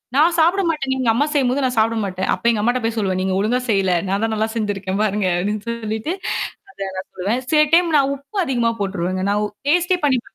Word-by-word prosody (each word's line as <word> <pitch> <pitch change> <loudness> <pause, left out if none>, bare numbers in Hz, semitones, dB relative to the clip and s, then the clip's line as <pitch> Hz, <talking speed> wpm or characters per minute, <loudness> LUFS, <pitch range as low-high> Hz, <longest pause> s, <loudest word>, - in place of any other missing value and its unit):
நான் 330 +4 +4
சாப்பிட 345 +5 +4
மாட்டேன் 285 -5 -1
நீங்க 260 -2 -2
அம்மா 270 +6 +2
செய்யும்போது 270 -1 +1
நான் 250 -2 -2
சாப்பிட 225 +1 +2
மாட்டேன். 190 -1 -3
அப்ப - - -6
எங்க 225 -3 +1
அம்மாட்ட 245 +3 +1
போய் 225 0 -1
சொல்லுவேன். 190 -3 0
"நீங்க 190 0 0
ஒழுங்கா 235 +5 +1
செய்யல. 195 -3 +2
நான் 195 +2 0
தான் 225 - 0
நல்லா 220 +1 0
செஞ்சுருக்கேன் 200 -3 -2
பாருங்க" 205 -2 0
அப்டின்னு 205 +3 -2
சொல்லிட்டு 225 +5 -3 0.6
அத 195 - -6
நான் 185 - -5
சொல்லுவேன். 205 +7 -1
சில 305 - +5
டைம் 340 -2 +4
நான் 275 -1 +2
உப்பு 280 +10 -11
அதிகமா 240 -4 +1
போட்டுருவேங்க. 185 -2 -2
நான் 205 +1 +1
ஒ - - -2 0.2
டேஸ்ட்டே 355 +4 +3
பண்ணீபாக்க 255 -4 +1
225 Hz, 215 wpm, -20 LUFS, 200-275 Hz, 0.6 s, சில